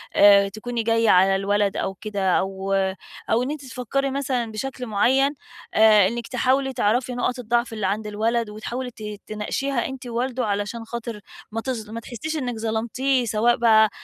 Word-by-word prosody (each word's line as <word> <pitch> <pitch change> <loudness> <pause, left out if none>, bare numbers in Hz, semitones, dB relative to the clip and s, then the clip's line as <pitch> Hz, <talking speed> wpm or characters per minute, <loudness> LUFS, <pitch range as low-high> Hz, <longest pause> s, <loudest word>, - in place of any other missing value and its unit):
آآ، 200 -1 +7
تكوني 230 +3 -4
جاية 230 0 +2
على 190 +1 +5
الولد 200 +1 +1
أو 195 - -2
كده، 200 -2 -2
أو 195 0 -3 0.6
أو 235 +2 +3
إن 265 - -2
أنتِ 295 -2 -6
تفكري 265 +2 -2
مثلًا 260 -4 -1
بشكل 255 +3 -5
معيّن، 265 +7 +2 0.4
آآ، 215 -3 +6
إنِك 235 +2 -4
تحاولي 265 +2 +1
تعرفي 245 +3 +1
نقط 250 +1 -1
الضعف 240 0 0
اللي 215 -3 -1
عند 210 +2 -2
الولد 225 +2 0
وتحاولي 240 +4 -5
ت 225 -2 -12 0.2
تناقشيها 235 +4 -2
أنتِ 265 -1 -8
ووالده، 245 +1 -2
علشان 210 +3 -2
خاطر 235 -1 -6 0.3
ما 225 +1 -3
تظ 225 -4 -4
ما 230 +1 -5
تحسيش 260 +7 -5
إنك 245 -5 -3
ظلمتيه، 235 +4 0
سواء 230 +2 +2
بقى 220 -2 +5
230 Hz, 165 wpm, -23 LUFS, 210-250 Hz, 0.6 s, آآ